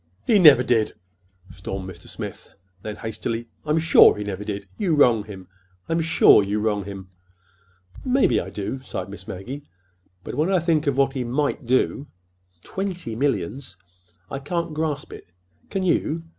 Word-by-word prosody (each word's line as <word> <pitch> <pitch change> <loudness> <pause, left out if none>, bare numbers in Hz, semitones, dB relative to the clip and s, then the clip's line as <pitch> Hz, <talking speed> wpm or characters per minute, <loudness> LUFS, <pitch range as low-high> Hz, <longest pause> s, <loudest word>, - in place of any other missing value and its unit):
'" 95 - -39
"He 215 -3 +4
never 150 -8 +8
did!" 115 -4 +1 0.6
stormed 95 0 -6
Mr. 90 -3 -11
Smith; - - -8 0.3
then, 105 +1 -6
hastily: 115 +2 -4 0.2
"I'm 150 +1 +1
sure 160 -7 +6
he 105 - -3
never 100 -1 -5
did. 100 -1 -5
You 175 -6 +1
wrong 120 -7 +4
him. 95 -3 -10 0.4
I'm 165 0 0
sure 160 -8 +6
you 100 +2 -1
wrong 105 -2 -1
him." 95 -2 -8 1.0
"Maybe 260 +1 +3
I - - -7
do," 105 +6 -5
sighed 95 -7 -6
Miss 100 -1 -10
Maggie. 125 +10 -6 0.6
"But - - -6
when 155 +8 0
I 190 - +4
think 160 -3 +1
of 140 -2 +1
what 135 -1 +2
he 130 -3 -2
might 135 +1 -1
do—Twenty 110 - -3
millions! 135 -4 -2 0.5
I 135 - -3
can't 170 +3 -3
grasp 150 -2 -3
it. - - -12 0.4
Can 195 - -2
you? 165 -2 0
125 Hz, 160 wpm, -23 LUFS, 100-155 Hz, 1.0 s, never